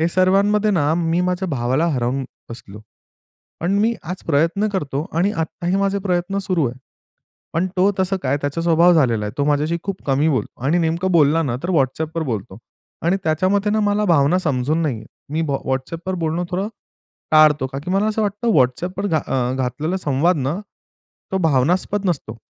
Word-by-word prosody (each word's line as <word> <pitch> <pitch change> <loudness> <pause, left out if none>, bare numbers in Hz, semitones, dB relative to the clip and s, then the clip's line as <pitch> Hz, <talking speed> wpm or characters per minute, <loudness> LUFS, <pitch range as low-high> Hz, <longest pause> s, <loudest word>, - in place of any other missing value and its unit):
हे 165 - +2
सर्वांमध्ये 200 +4 +3
ना 155 -6 +2
मी 170 0 0
माझ्या 180 +1 -1
भावाला 130 +3 0
हरवून 130 +1 -1 0.3
बसलो. 105 -3 -10 0.8
पण 175 +3 -1
मी 230 +2 +2
आज 180 +3 -6
प्रयत्न 165 +7 +2
करतो 150 -5 -2
आणि 195 +4 +2
आत्ताही 170 +2 -2
माझे 200 0 0
प्रयत्न 180 +2 0
सुरू 175 -6 +1
आहे. 125 - -7 0.8
पण 170 +3 +1
तो 190 +3 +4
तसं 190 +1 +1
काय 140 +2 +1
त्याचा 145 +4 -2
स्वभाव 170 +1 +5
झालेला 120 -9 +2
आहे, 105 - -4
तो 145 - +1
माझ्याशी 150 +3 +1
खूप 195 -1 -5
कमी 140 +2 +2
बोलतो 130 -3 -3
आणि 155 +5 +3
नेमकं 170 +3 0
बोलला 160 -1 +4
ना 120 -4 -1
तर 175 - -2
WhatsAppवर 160 +2 0
बोलतो. 105 -6 -4 0.5
आणि 175 +4 +2
त्याच्यामते 185 +6 +1
ना 215 +1 +1
मला 205 0 +1
भावना 165 0 +3
समजून 155 0 0
नाहीये 125 -9 -2 0.3
मी 160 - 0
WhatsAppवर 140 +7 -3
बोलणं 165 +2 -1
थोडं 190 +3 -1 0.6
टाळतो. 150 -3 +5
का 135 +1 -6
की 180 - -2
मला 195 +2 +2
असं 215 0 -1
वाटतं 210 +3 0
WhatsAppवर 175 +9 +1
घात 160 -5 -1
अ, 125 -1 0
घातलेला 150 +7 -2
संवाद 160 +1 +1
ना 140 +7 -2 0.7
तो 190 - +1
भावनात्मक 175 +6 +1
नसतो. 120 -9 -3
165 Hz, 175 wpm, -20 LUFS, 140-185 Hz, 0.8 s, स्वभाव